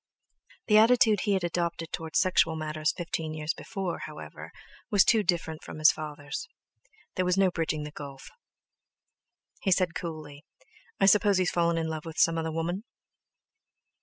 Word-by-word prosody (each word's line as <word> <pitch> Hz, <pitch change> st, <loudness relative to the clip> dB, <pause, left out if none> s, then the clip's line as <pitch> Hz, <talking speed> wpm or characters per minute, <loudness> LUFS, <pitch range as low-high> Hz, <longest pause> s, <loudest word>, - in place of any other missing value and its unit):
The 210 Hz, -1 st, +6 dB
attitude 225 Hz, -2 st, +5 dB
he 205 Hz, -, +2 dB
had 190 Hz, -2 st, 0 dB
adopted 170 Hz, -1 st, -2 dB
towards 160 Hz, -1 st, -3 dB
sexual 170 Hz, -3 st, +3 dB
matters 155 Hz, -1 st, -1 dB
fifteen 160 Hz, -3 st, -4 dB
years 155 Hz, +1 st, -2 dB
before, 195 Hz, -6 st, -5 dB
however, -, -, -10 dB, 0.4 s
was 205 Hz, -4 st, +5 dB
too 225 Hz, -, +4 dB
different 170 Hz, -4 st, -1 dB
from -, -, -9 dB
his 155 Hz, 0 st, +6 dB
father's. 155 Hz, -, -6 dB, 0.6 s
There 185 Hz, -, 0 dB
was 180 Hz, +1 st, +1 dB
no 190 Hz, -2 st, +4 dB
bridging 160 Hz, -3 st, -2 dB
the 150 Hz, -, -7 dB
gulf. 140 Hz, -2 st, -10 dB, 1.3 s
He 195 Hz, -, 0 dB
said 180 Hz, -2 st, +2 dB
coolly: 155 Hz, -4 st, -7 dB, 0.6 s
"I 195 Hz, -, +4 dB
suppose 205 Hz, 0 st, +5 dB
he's 185 Hz, -1 st, +1 dB
fallen 170 Hz, -1 st, +1 dB
in 165 Hz, -1 st, -1 dB
love 160 Hz, 0 st, -5 dB
with 165 Hz, -1 st, -8 dB
some 165 Hz, 0 st, +3 dB
other 160 Hz, 0 st, -2 dB
woman?" 170 Hz, +5 st, -3 dB
170 Hz, 160 wpm, -28 LUFS, 155-190 Hz, 1.3 s, The